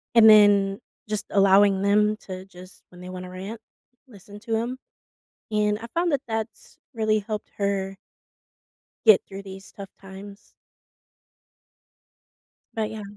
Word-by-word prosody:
And 220 -1 +8
then 205 -2 +5 0.3
just 215 -1 -2
allowing 195 0 +4
them 210 +1 +2
to 185 0 -7
just 185 0 -15
when 180 0 -15
they 180 - -9
wanna 185 0 -7
rant, 195 +5 -7 0.5
listen 205 -3 -14
to 225 0 -2
'em, 240 +3 -3 0.7
and 210 -1 +1
I 230 - -8
found 340 -1 +1
that 280 - +1
that's 225 0 -6 0.2
really 215 -1 +1
helped 210 +1 -6
her 195 -1 -2 1.1
get 215 -4 +7
through 195 0 -9
these 195 0 -11
tough 200 -1 -9
times. 195 +1 -12 2.2
But, 220 -1 -1
yeah. 220 -1 -7
205 Hz, 130 wpm, -24 LUFS, 195-215 Hz, 2.2 s, And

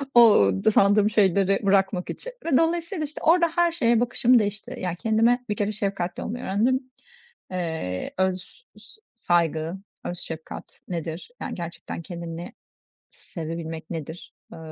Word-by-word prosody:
o 220 - +7 0.2
sandığım 205 +1 +5
şeyleri 195 -2 +3
bırakmak 195 -2 +2
için - - -5
ve 310 -6 +3
dolayısıyla, 335 +1 0
işte, 300 - -9
orada 340 +1 +5
her 345 -1 +3
şeye 240 -9 +2
bakışım 245 +1 +4
değişti. 205 -1 -3
Yani, 180 -2 -2
kendime 230 +4 +2
bir 210 - 0
kere 205 0 0
şefkatli 195 -4 -2
olmayı 245 +3 -5
öğrendim. 255 +6 +1 0.6
Eee, 160 - -3
öz 190 - -2
s 440 - -14
saygı, 170 -5 +1 0.3
öz 175 - -3
şefkat 160 -2 -8
nedir, 170 - -5
yani, - - -4
gerçekten 170 -1 -6
kendini 170 0 -7 0.6
sevebilmek 160 -2 -7
nedir, 160 0 -7 0.2
eee, - - -9
195 Hz, 135 wpm, -25 LUFS, 170-240 Hz, 0.6 s, o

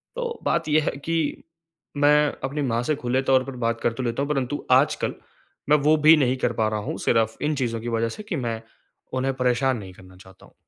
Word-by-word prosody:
तो 485 -1 -4
बात - - 0
ये 155 +1 +4
है - - -1
कि 165 -2 -1 0.5
मैं 150 +1 +4
अपनी 145 +3 -2
माँ 120 -3 0
से 155 +5 0
खुले 130 0 -1
तौर 130 -1 +3
पर 135 -1 -8
बात 115 0 -1
कर 115 - +1
तो 130 - -5
लेता 120 +2 -2
हूँ, 145 - -4
परंतु 140 0 -2
आजकल - - +3 0.6
मैं 150 - +6
वो 150 +2 +3
भी 160 - +10
नहीं 130 -2 +1
कर 120 -2 0
पा 110 -1 +1
रहा 110 0 -2
हूँ - - -4
सिर्फ 115 -1 +1
इन 150 0 0
चीज़ों 115 -4 -2
की 120 - -4
वज़ह 115 0 0
से 215 - -8
कि 210 -5 -4
मैं, 115 -4 -3 0.5
उन्हें 130 +1 0
परेशान 125 0 +1
नहीं 95 -4 -9
करना 95 0 -16
चाहता 95 0 -17
हूँ। - - -22
130 Hz, 230 wpm, -24 LUFS, 115-150 Hz, 0.6 s, भी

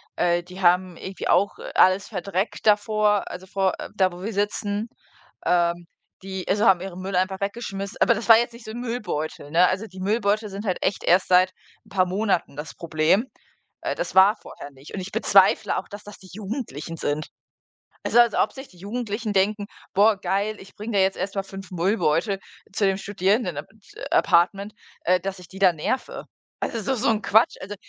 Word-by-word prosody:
äh, 175 0 +1
die 180 +2 -11
haben 180 0 +3
irgendwie 190 0 -6
auch, 200 +1 +2
äh, - - -7
alles 185 +1 +4
verdreckt 195 0 -3
davor, 210 -1 +2
also, 180 +1 -8
vor 190 0 0
äh, - - -6
da, 190 -2 +3
wo 175 +1 -10
wir 220 +2 -3
sitzen 205 +1 -1 0.6
ähm, 175 0 +1 0.4
die, 190 -1 -6
also 205 +3 +2
haben 185 -2 +5
ihren 185 -1 -7
Müll 190 0 -4
einfach 190 +1 0
weggeschmiss 200 -1 -4
aber 235 - +5
das 225 +2 -6
war 225 - +10
jetzt 240 +1 0
nicht 235 0 -13
so 220 - -7
'n 235 - -6
Müllbeutel, 180 -12 -4
ne? 175 +3 +5
Also, 190 +4 -2
die 185 -1 -12
Müllbeutel 210 +1 0
sind 200 +2 -7
halt 185 -3 -1
echt 195 - -1
erst 180 +2 +3
seit 185 0 +5 0.3
'n - - -21
paar 190 -2 +2
Monaten 190 -5 -1
das 150 -1 -6
Problem. 170 +8 +1 0.5
Äh, - - -2
das - - -4
war 195 +3 +7
vorher 145 - -11
nicht, 135 +1 -14
und - - -4
ich 185 +2 -7
bezweifle - - +4
auch, - - -4
dass 205 0 -9
das 205 0 -11
die 190 - -15
Jugendlichen 195 - -6
sind. 150 0 -2 0.8
Also, 240 - +4
als 235 -2 +5
ob - - +2
sich 265 0 -9
die 180 - -20
Jugendlichen 215 +2 -4
denken: 205 +2 +1 0.3
„Boah, 205 +2 +4
geil, 200 +3 -1
ich 190 - -14
bringe 215 +2 -6
da 200 - +3
jetzt 190 0 +2
erst 195 +2 -4
mal 195 - -1
5 195 -1 -10
Müllbeutel 185 0 +1 0.4
zu 205 - +1
dem 195 -1 +2
Studierendenap 195 - -1 0.3
äh, - - -9
Apartment, 195 +4 +2 0.3
äh, 180 +1 +4
dass 195 +1 -5
ich 180 - -13
die 190 - -11
da 190 -2 +6
nerve." 210 +11 -3 0.4
Also, 230 - -2
das 215 - -8
ist - - -1
doch 265 - +1
so 235 - +1
'n 220 -1 +1
Quatsch. 220 +4 +4
Also, 200 +2 -6
195 Hz, 205 wpm, -24 LUFS, 180-210 Hz, 0.8 s, war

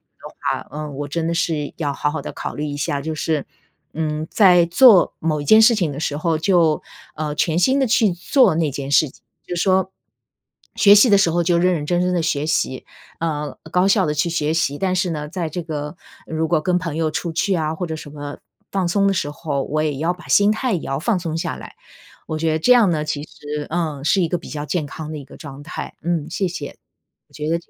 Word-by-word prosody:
的 - - -15 0.3
话， - - -23
嗯， 150 -2 -6
我 145 +1 -4
真 160 +2 -2
的 170 - 0
是 155 -4 -1
要 145 -4 -2
好 150 +1 -1
好 155 -1 -4
地 - - -6
考 - - -6
虑 150 - -4
一 145 - -4
下。 140 0 -2
就 160 +2 -3
是， 155 -1 -1 0.5
嗯， 155 0 -3
在 180 -5 +6
做 185 +2 +6
某 155 -2 -1
一 - - -7
件 220 +8 +7
事 230 +1 +6
情 175 -8 0
的 140 - -6
时 145 -2 -2
候， 160 +1 0
就， 165 -3 +2 0.3
呃， 150 -1 -3
全 160 +2 +1
心 260 +10 +3
地 265 - +2
去 220 -4 +3
做 185 - +3
那 160 -2 0
件 140 0 -5
事 145 -1 +4
情。 - - -22 0.3
就 - - -4
是 175 - -1
说， 190 -1 +2 0.9
学 205 -1 +7
习 210 +3 +6
的 200 - +6
时 195 -4 +3
候 175 +1 +1
就 170 0 +2
认 180 +1 +3
认 150 - -3
真 175 +3 0
真 180 0 +1
的 175 - +1
学 150 -2 -1
习， 130 -4 -1 0.3
呃， 150 -3 -3
高 180 +2 +3
效 195 -2 +3
的 150 - -1
去 160 +3 0
学 155 -1 0
习。 145 -3 0
但 185 +1 0
是 180 -1 0
呢， 150 -2 -4
在 170 0 -3
这 175 +2 -5
个 150 -1 -5 0.3
如 160 0 -1
果 160 -1 +1
跟 180 +1 +1
朋 170 -4 -4
友 160 -1 0
出 165 +2 -3
去 190 +4 0
啊， 155 -1 -1
或 175 +2 -4
者 160 - -3
什 150 -2 -10
么 145 -1 -7 0.3
放 190 -3 0
松 200 +3 +2
的 195 - +2
时 170 - -1
候， 145 -2 -3
我 155 +1 -1
也 150 -3 -2
要 165 +3 0
把 180 - -15
心 205 +1 +5
态 245 +3 -1
也 170 - -1
要 135 0 -3
放 195 +4 +1
松 165 -2 -4
下 170 +1 -3
来。 - - -11 0.5
我 155 - -3
觉 160 0 0
得 155 - +1
这 250 - +5
样 240 -5 +5
呢， 155 -2 -1
其 150 -1 -3
实， 150 -1 -7
嗯， 155 -4 -2
是 190 +4 +3
一 170 - +1
个 175 - -1
比 - - -12
较 145 -1 -5
健 155 -1 -2
康 155 +2 -7
的 155 - -5
一 140 - -9
个 135 - -14
状 140 -1 -10
态。 155 - -7
嗯， 165 -2 -1
谢 190 +3 -1
谢。 170 -5 -6 0.5
我 - - -29
觉 150 0 -5
得 165 - +2
160 Hz, 270 characters per minute, -20 LUFS, 150-180 Hz, 0.9 s, 件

